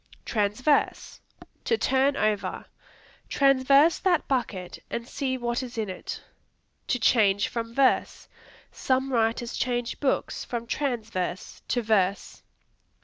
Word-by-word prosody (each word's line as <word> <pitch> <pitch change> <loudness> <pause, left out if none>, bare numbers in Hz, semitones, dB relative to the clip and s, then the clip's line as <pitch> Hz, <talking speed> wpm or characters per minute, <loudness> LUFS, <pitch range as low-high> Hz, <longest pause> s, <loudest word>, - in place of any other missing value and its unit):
Transverse 220 +7 0 0.5
To 460 - +2
turn 270 -1 +2
over; 215 -1 -1 0.6
"Transverse 275 +3 +4
that 355 -4 +1
bucket 205 -9 -2
and 235 0 -4
see 260 -2 -2
what 240 +1 -2
is 250 -2 -8
in 215 -4 -2
it." 185 - -7 0.6
To 250 - +1
change 210 -4 +3
from 230 0 -5
verse; 270 -2 +1 0.4
"Some 265 0 -1
writers 230 0 0
change 245 -1 -2
books 275 - -1
from 235 -1 -4
transverse 225 -9 -3
to 245 - 0
verse." 200 -3 0
240 Hz, 115 wpm, -26 LUFS, 220-270 Hz, 0.6 s, Transverse